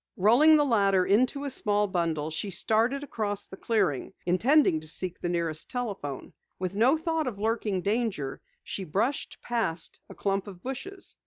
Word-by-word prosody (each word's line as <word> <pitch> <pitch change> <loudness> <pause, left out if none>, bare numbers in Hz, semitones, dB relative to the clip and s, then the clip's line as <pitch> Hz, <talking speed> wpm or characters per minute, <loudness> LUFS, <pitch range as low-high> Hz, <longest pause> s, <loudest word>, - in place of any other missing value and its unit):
Rolling 245 +11 +6
the 295 -1 +4
ladder 200 -7 +3
into 255 +7 +2
a 280 - -2
small 210 -4 +2
bundle, 165 -5 -1
she 160 +6 -3
started 225 +8 +1
across 205 -7 -3
the - - -10
clearing, 195 - 0
intending 185 - +4
to 155 - -5
seek 180 +3 0
the 175 - -2
nearest 165 -3 -2
telephone. 200 - -4 0.2
With 185 +1 -3
no 250 +9 +4
thought 325 -2 -1
of 230 -5 -4
lurking 210 -3 -1
danger, 200 - -1 0.2
she 195 - -4
brushed 210 - -1
past 225 -9 -2
a - - -10
clump 195 0 -1
of 185 -3 -11
bushes. 370 +10 -6
205 Hz, 165 wpm, -28 LUFS, 180-245 Hz, 0.2 s, Rolling